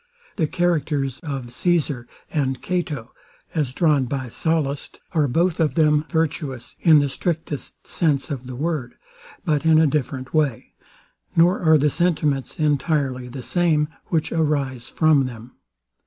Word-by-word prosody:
The 160 - +2
characters 150 -6 0
of 135 -5 -5
Caesar 145 -6 0 0.2
and 135 -4 0
Cato, 155 -10 -3 0.4
as 150 -6 0
drawn 145 -2 +2
by 130 0 -3
Sallust, 145 0 -2
are 155 -4 +2
both 170 +6 +1
of 160 -2 +1
them 150 -2 +3
virtuous, 155 -6 -2
in 160 -2 +6
the 145 -1 +3
strictest 160 0 -4
sense 150 -2 0
of 130 -3 -5
the 130 - -6
word; 150 -3 -2 0.5
but 150 -4 +1
in 160 -1 +5
a 160 - +5
different 130 -3 -2
way: 150 -7 0 0.6
Nor 175 +4 +4
are 160 -2 +5
the 150 0 +2
sentiments 150 -6 0
entirely 145 -4 0
the 125 +1 -7
same, 155 -1 +2 0.2
which 160 -3 0
arise 140 -6 -1
from 155 -4 +3
them. 120 0 -10
150 Hz, 140 wpm, -22 LUFS, 135-160 Hz, 0.6 s, in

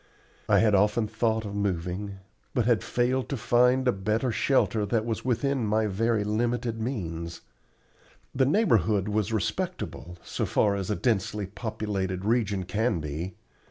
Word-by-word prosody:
I - - +6
had 110 -2 +4
often 105 +3 +3
thought 110 0 0
of 100 - -5
moving, 95 0 -2 0.4
but 120 - +2
had 120 -3 +2
failed 125 +1 0
to 140 - -2
find 125 +3 +3
a - - +6
better 110 +5 0
shelter 110 -2 +2
that 110 +1 0
was 115 -2 -3
within 130 +1 0
my 110 +1 +2
very 110 +2 +1
limited 115 +2 -1
means. 85 -9 -4 0.9
The 130 0 +2
neighborhood 110 - +3
was 105 0 0
respectable, 90 -3 -3
so - - -3
far 105 - +2
as 100 -1 -3
a 105 - +1
densely 105 -3 0
populated 95 -2 -3
region 105 -4 +1
can 105 +1 0
be. 80 +5 -5
110 Hz, 150 wpm, -27 LUFS, 100-120 Hz, 0.9 s, I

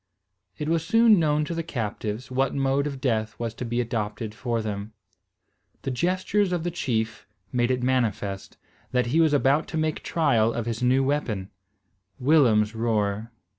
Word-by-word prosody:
It 150 - -3
was 165 0 +1
soon 225 +3 +5
known 150 -1 +2
to 170 - -4
the 165 - -2
captives, 115 -4 -4
what 135 +1 0
mode 135 +1 +1
of 140 -2 -5
death 110 -5 -1
was 115 -2 -3
to 125 - -6
be 120 +1 -1
adopted 110 -2 -3
for 115 +1 -2
them. 105 -1 -4 0.9
The 135 - -2
gestures 185 +7 +1
of 175 -2 -1
the 175 - -1
chief 115 -9 -2 0.2
made 120 -1 +1
it 125 -1 0
manifest, 110 -6 -1 0.4
that 125 -1 +2
he 165 - +5
was 160 -2 +4
about 145 +2 +3
to 160 - -4
make 155 -1 -1
trial 115 -9 +2
of 120 - -3
his 115 0 -3
new 130 +2 +3
weapon, 120 -9 -1 0.7
Willem's 125 -7 +4
roer. 110 -1 -1
125 Hz, 170 wpm, -25 LUFS, 110-150 Hz, 0.9 s, soon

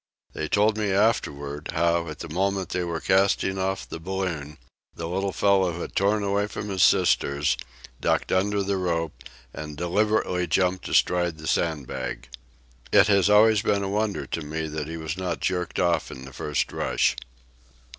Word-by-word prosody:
They 80 - -3
told 105 +5 +2
me 105 -1 0
afterward, 75 -9 0
how, 85 0 +1
at 80 -1 -6
the 85 - -7
moment 95 +3 -1
they 90 - -1
were 85 -1 -3
casting 95 +1 +2
off 95 0 -2
the - - -7
balloon, 85 -5 -4 0.4
the 85 - -5
little 95 +3 -1
fellow 95 -4 +2
had - - -6
torn 100 +2 +2
away 100 +1 0
from 105 0 -6
his 95 -2 -1
sisters, 70 -1 +3 0.4
ducked - - 0
under 100 +2 +1
the 100 0 -1
rope, 85 -4 -1 0.4
and 75 -1 -7
deliberately 90 0 +1
jumped 90 +2 +1
astride 85 -2 +2
the 80 - -10
sandbag. 70 -7 -2 0.6
It - - +6
has 100 -1 +4
always 105 0 +6
been 100 -2 +1
a 95 - -2
wonder 105 0 -1
to 85 - -4
me 80 +2 -4
that 75 -1 -4
he 80 +1 -5
was 80 +1 -4
not 90 -2 -3
jerked 90 -1 -2
off 85 -3 +1
in 65 0 -9
the 65 - -11
first 75 +2 -2
rush. - - +1
90 Hz, 170 wpm, -25 LUFS, 80-100 Hz, 0.6 s, It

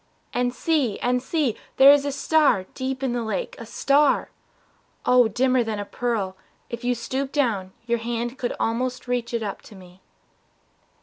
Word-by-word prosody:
And 245 0 +1
see, 265 -5 0
and 250 0 +1
see, 275 -4 0 0.2
There 270 +1 +9
is 285 0 +4
a 285 - -1
star, 280 -8 +2
deep 260 0 -4
in 255 -3 0
the 240 - -1
lake, 470 - -3
a - - -8
star! 285 +1 +2 0.7
Oh, 250 -2 +5
dimmer 255 +3 +2
than 220 -2 -3
a 205 - -4
pearl 210 -4 -2 0.4
if 235 0 -5
you 245 0 +1
stoop 265 +3 -3
down 225 -10 0
Your 235 0 0
hand 235 +2 -3
could 245 - -2
almost 250 +3 -1
reach 245 -1 -1
it 235 -2 -1
up 200 -2 -5
to 215 - -14
me. 185 0 -15
245 Hz, 175 wpm, -24 LUFS, 225-265 Hz, 0.7 s, There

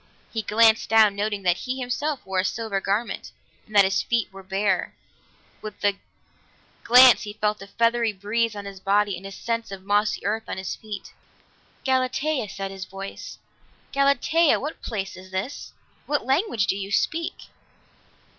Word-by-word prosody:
He 225 - -1
glanced 225 +1 +4
down, 220 -2 +5
noting 205 -1 -2
that 180 -1 +3
he 260 +1 -4
himself 260 +3 -2
wore 190 -1 -1
a - - +2
silver 200 -1 -2
garment, 205 +5 -2 0.4
and 215 - -12
that 200 - +8
his 190 0 +1
feet 230 -5 -1
were 195 - -10
bare; 190 0 -1 0.7
with 215 0 -8
the 200 -1 +2 0.9
glance 250 0 +8
he 205 - -6
felt 210 -1 -1
a 195 - -9
feathery 230 +2 +1
breeze 210 +3 -1
on 205 -1 -6
his 195 -1 -8
body 200 +1 +2
and 190 +3 -8
a - - -9
sense 230 +2 -3
of 195 -1 -8
mossy 205 +2 +1
earth 220 +2 -1
on - - -4
his 190 0 -4
feet. 210 -3 -8 0.7
"Galatea," 260 -1 0
said 195 0 -5
his 190 -1 -7
voice. 195 +1 -8 0.6
"Galatea, 280 +3 +3
what 300 +4 -6
place 195 -3 -4
is 185 0 -12
this? 190 +9 -5 0.4
What 290 -3 0
language 265 - +1
do 190 - 0
you 200 0 -5
speak?" 330 +10 -1
210 Hz, 165 wpm, -24 LUFS, 195-240 Hz, 0.9 s, that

